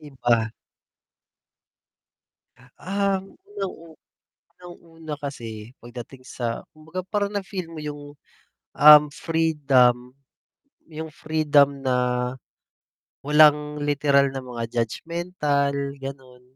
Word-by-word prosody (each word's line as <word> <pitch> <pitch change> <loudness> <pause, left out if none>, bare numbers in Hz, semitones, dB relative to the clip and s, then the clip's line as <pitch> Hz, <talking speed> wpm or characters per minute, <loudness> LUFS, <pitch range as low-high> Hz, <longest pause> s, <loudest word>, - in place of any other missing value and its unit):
Iba. 120 -6 0 2.3
Ang 195 0 -2
unang-u 195 - -6 0.7
unang-una 165 -3 -10
kasi 115 -5 -7
pagdating 120 +2 -10
sa 120 -3 -4
kumbaga 160 +4 -7
parang 205 -1 -1
na-feel 190 -3 -4
mo 160 - -7
yung, 145 -1 -6 0.8
um, 150 0 +10 0.2
freedom, 140 -7 +2 0.8
yung 160 0 -7
freedom 145 -3 +2
na 130 -1 +1 1.3
walang 150 0 +4
literal 140 -1 +2
na 135 0 -5
mga 120 -2 -6 0.2
judgemental 150 +2 -1 0.2
ganon. 135 -2 -9
150 Hz, 85 wpm, -24 LUFS, 130-165 Hz, 2.3 s, um